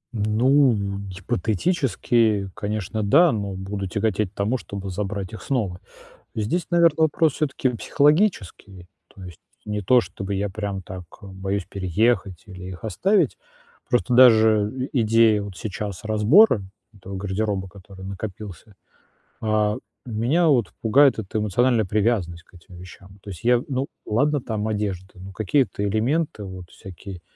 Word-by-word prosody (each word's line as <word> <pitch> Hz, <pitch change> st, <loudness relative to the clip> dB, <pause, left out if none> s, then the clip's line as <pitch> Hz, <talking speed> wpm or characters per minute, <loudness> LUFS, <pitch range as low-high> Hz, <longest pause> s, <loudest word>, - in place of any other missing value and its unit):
Ну, 120 Hz, +5 st, +3 dB, 0.3 s
гипотетически, 110 Hz, -, 0 dB
конечно, 105 Hz, 0 st, -3 dB
да, 150 Hz, +11 st, +5 dB
но 100 Hz, -3 st, -3 dB
буду 95 Hz, +1 st, -5 dB
тяготеть 105 Hz, 0 st, -1 dB
к -, -, -41 dB
тому, 105 Hz, +6 st, 0 dB
чтобы 100 Hz, -1 st, -7 dB
забрать 100 Hz, 0 st, -4 dB
их 110 Hz, -, -8 dB
снова. 105 Hz, -10 st, -2 dB, 0.6 s
Здесь, 120 Hz, +12 st, -1 dB
наверно, 170 Hz, -3 st, +4 dB
вопрос 155 Hz, -1 st, +2 dB
всё-таки 140 Hz, -3 st, -1 dB
психологический. 125 Hz, -, 0 dB, 0.3 s
То 95 Hz, -, -13 dB
есть 90 Hz, -3 st, -11 dB, 0.3 s
не 105 Hz, -1 st, -3 dB
то 125 Hz, +6 st, +5 dB
чтобы 100 Hz, -3 st, -6 dB
я 100 Hz, +1 st, -1 dB
прям 100 Hz, 0 st, -4 dB
так, 90 Hz, 0 st, -9 dB, 0.2 s
а, -, -, -12 dB
боюсь 95 Hz, 0 st, -4 dB
переехать 100 Hz, 0 st, 0 dB
или 95 Hz, -3 st, -10 dB
их 90 Hz, +3 st, -10 dB
оставить. 195 Hz, -, +1 dB, 0.5 s
Просто 125 Hz, 0 st, +1 dB
даже 110 Hz, 0 st, +5 dB
идея 115 Hz, -3 st, +3 dB
вот 100 Hz, -2 st, -8 dB
сейчас 100 Hz, -1 st, -5 dB
разбора 110 Hz, -, +5 dB, 0.3 s
этого 95 Hz, -1 st, -9 dB
гардероба, 100 Hz, 0 st, -2 dB
который 95 Hz, 0 st, -13 dB
накопился, 100 Hz, 0 st, -8 dB, 0.7 s
а, 105 Hz, -1 st, +1 dB, 0.3 s
меня 125 Hz, +9 st, +1 dB
вот 120 Hz, -, +2 dB
пугает 135 Hz, +5 st, +4 dB
эта 110 Hz, 0 st, -4 dB
эмоциональная 110 Hz, +2 st, +2 dB
привязанность 95 Hz, -4 st, -1 dB
к -, -, -30 dB
этим 90 Hz, +2 st, -16 dB
вещам. 95 Hz, +2 st, -13 dB
То -, -, -9 dB
есть 95 Hz, +3 st, -9 dB
я 120 Hz, 0 st, +4 dB
ну, 135 Hz, 0 st, -1 dB, 0.2 s
ладно 145 Hz, +6 st, +1 dB
там 110 Hz, -3 st, -3 dB
одежда, 100 Hz, -3 st, -3 dB
но 95 Hz, +1 st, -9 dB
какие-то 110 Hz, +2 st, 0 dB
элементы, 115 Hz, +3 st, -1 dB
вот 95 Hz, -2 st, -9 dB
всякие 95 Hz, -2 st, -10 dB
105 Hz, 140 wpm, -23 LUFS, 95-120 Hz, 0.7 s, да